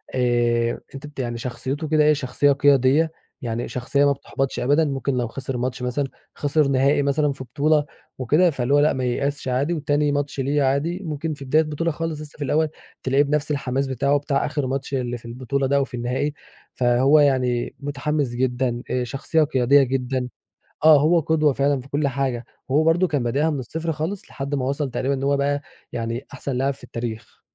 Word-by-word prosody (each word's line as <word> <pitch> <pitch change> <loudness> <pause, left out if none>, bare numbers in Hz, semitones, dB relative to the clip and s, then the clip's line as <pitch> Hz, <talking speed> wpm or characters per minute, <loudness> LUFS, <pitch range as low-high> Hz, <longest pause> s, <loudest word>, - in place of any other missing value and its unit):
آآ، 120 -2 +1
أنتِ 135 +2 -7
بت 145 -2 -12
يعني 120 -2 -2
شخصيته 130 +6 -4
كده 155 0 +3
إيه 150 0 +5
شخصية 140 0 +1
قيادية، 140 +3 +4 0.3
يعني 120 -1 -3
شخصية 140 +3 +1
ما 140 - +4
بتحبطش 135 -1 -3
أبدًا. 145 +5 +3
ممكن 140 -1 -1
لو 120 - 0
خسر 130 +2 -4
ماتش 125 +1 -3
مثلًا، 125 +3 -1 0.3
خسر 145 0 +1
نهائي 140 +2 +3
مثلًا 145 +1 +1
في 130 - -7
بطولة 145 +4 +1 0.3
وكده، 150 +8 +3
فاللي 135 -2 -1
هو 145 - +6
لأ، 150 +1 +4
ما 130 - -2
ييأسش 140 +3 -1
عادي، 135 +7 0
وتاني 145 -1 +1
ماتش 145 -1 -2
ليه 140 +2 +1
عادي 140 +7 0
ممكن 155 -1 -3
في 140 -1 -9
بداية 155 +5 +3
بطولة 155 +2 -2
خالص 160 -1 -4
لسه 150 0 -8
في 145 - -4
الأول، 155 +3 +1 0.3
تلاقيه 135 +2 +3
بنفس 150 +1 0
الحماس 135 -1 -1
بتاعه 140 +2 +1
بتاع 140 -1 0
آخر 145 -3 -2
ماتش 135 +1 -3
اللي 125 -2 -1
في 120 - -16
البطولة 130 +3 -2
ده 140 - +1
أو 140 - +3
في - - -19
النهائي. 130 +5 -1 0.4
فهو 130 +4 +4
يعني 125 -4 +1
متحمس 145 0 -1
جدًا، 125 0 -1
آآ، 125 - 0
شخصية 135 +6 0
قيادية 135 -1 +4
جدًا 130 0 -1 0.6
آه 155 -2 +8
هو 165 +4 +4
قدوة 155 -1 +2
فعلًا 140 0 +1
في 135 - -15
كل 145 0 0
حاجة. 130 -3 -2 0.2
وهو 150 +4 +3
برضه 170 +3 +3
كان 145 -6 -1
بادئها 140 +7 +1
من 145 -3 -2
الصفر 160 +6 -3
خالص، 160 +6 -4
لحد 140 +1 -4
ما 130 - -1
وصل 140 +1 -1
تقريبًا 135 +3 -1
إن 135 0 -3
هو 140 0 +2
بقى 145 +1 0 0.3
يعني 115 +1 -3
أحسن 145 - -4
لاعب 135 +2 +1
في - - -17
التاريخ. 115 -2 -6
140 Hz, 200 wpm, -23 LUFS, 130-150 Hz, 0.6 s, آه